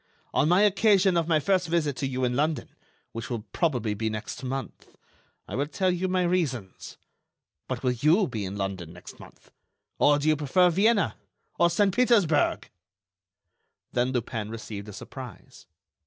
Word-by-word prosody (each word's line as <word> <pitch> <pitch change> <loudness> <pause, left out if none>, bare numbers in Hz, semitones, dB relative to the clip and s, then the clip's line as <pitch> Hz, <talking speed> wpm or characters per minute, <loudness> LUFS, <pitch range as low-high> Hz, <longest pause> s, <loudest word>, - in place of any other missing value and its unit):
On 150 - +2
my 180 +4 +5
occasion 200 -2 +4
of 165 -1 +1
my 160 -2 +3
first 185 +3 +1
visit 160 -4 0
to 135 - -1
you 130 -1 -3
in 125 -1 +1
London—which 140 -6 -4
will 115 -3 -3
probably 125 -10 0
be 110 +2 -2
next 110 +4 -6
month—I 135 +1 -9
will 140 +2 -1
tell 185 +4 0
you 180 +1 -1
my 185 0 +1
reasons. 145 - -2 0.7
But - - -4
will 125 - +2
you 155 - +3
be 110 -5 -4
in 95 +1 -5
London 95 -4 -4
next 90 - -12
month? - - -16 0.5
Or 145 0 +5
do 145 +1 -2
you 155 - +4
prefer 165 +5 +3
Vienna? 205 +4 +2 0.4
Or 170 - +5
Saint 195 +2 +2
Petersburg?" 215 -12 +2 1.2
Then 125 +1 0
Lupin 115 -4 -3
received 110 -2 -7
a - - -9
surprise. 125 +1 -11
145 Hz, 155 wpm, -26 LUFS, 115-180 Hz, 1.2 s, my